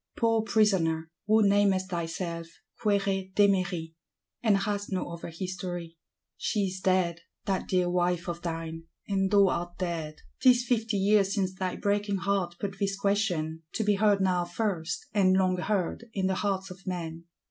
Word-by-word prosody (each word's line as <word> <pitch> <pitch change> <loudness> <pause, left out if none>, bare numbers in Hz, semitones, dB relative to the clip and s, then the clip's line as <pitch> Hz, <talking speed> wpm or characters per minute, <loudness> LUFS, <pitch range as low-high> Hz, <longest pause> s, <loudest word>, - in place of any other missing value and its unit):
Poor 225 -1 +3
Prisoner, 175 -8 +2 0.2
who 215 -1 +5
namest 200 -1 +2
thyself 170 0 -3 0.3
Quéret 195 -3 0
Démery, 185 -5 +2 0.5
and 215 -4 +4
hast 205 0 -2
no 185 -2 -2
other 170 0 -7
history,—she 175 +2 -5
is 185 0 -4
dead, 185 -3 +1 0.2
that 195 -2 -1
dear 180 -1 +2
wife 175 -1 0
of 170 0 -4
thine, 165 -1 -5 0.2
and 195 -1 +1
thou 200 -1 +5
art 175 0 -3
dead! 165 -4 -3 0.2
'Tis 250 -2 +5
fifty 225 -3 0
years 200 0 +3
since 190 -2 0
thy 185 -1 -3
breaking 205 0 0
heart 185 -2 -1
put 195 -1 -4
this 195 -1 0
question; 185 -6 0
to 220 - 0
be 210 0 +3
heard 205 -1 +3
now 180 -2 +2
first, 175 -2 -2
and 190 -3 +4
long 185 -1 +2
heard, 195 +3 -1
in 190 -2 0
the 190 - +2
hearts 190 -1 -1
of 185 +1 -12
men. 170 -2 -4
190 Hz, 160 wpm, -28 LUFS, 175-200 Hz, 0.5 s, who